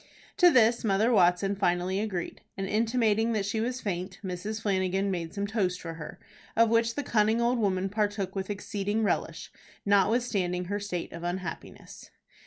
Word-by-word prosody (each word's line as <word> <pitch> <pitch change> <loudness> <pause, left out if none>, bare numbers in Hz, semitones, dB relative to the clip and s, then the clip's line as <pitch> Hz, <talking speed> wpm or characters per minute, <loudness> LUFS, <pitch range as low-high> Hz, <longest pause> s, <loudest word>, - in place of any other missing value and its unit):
To 360 -3 +7
this 235 -5 +4
Mother 215 +2 +2
Watson 190 -1 +3
finally 185 0 0
agreed, 200 -5 -4 0.2
and 195 - -2
intimating 225 +1 +1
that 205 -2 0
she 220 +2 -1
was 250 +2 -2
faint, 185 -1 -4
Mrs. 205 +4 -4
Flanagan 190 0 0
made 170 -3 -3
some 200 +1 -3
toast 200 -4 -1
for 165 -1 -6
her, 160 -2 -9 0.4
of 230 0 +5
which 230 0 +2
the 290 - -2
cunning 220 -1 +2
old 240 +1 +2
woman 190 -3 +1
partook 205 -1 -2
with 195 0 -3
exceeding 205 +1 -2
relish, 205 - -2 0.3
notwithstanding 200 -3 +1
her 205 +3 -2
state 190 -4 -4
of 170 - -7
unhappiness. 175 +1 -6
200 Hz, 165 wpm, -28 LUFS, 185-225 Hz, 0.4 s, To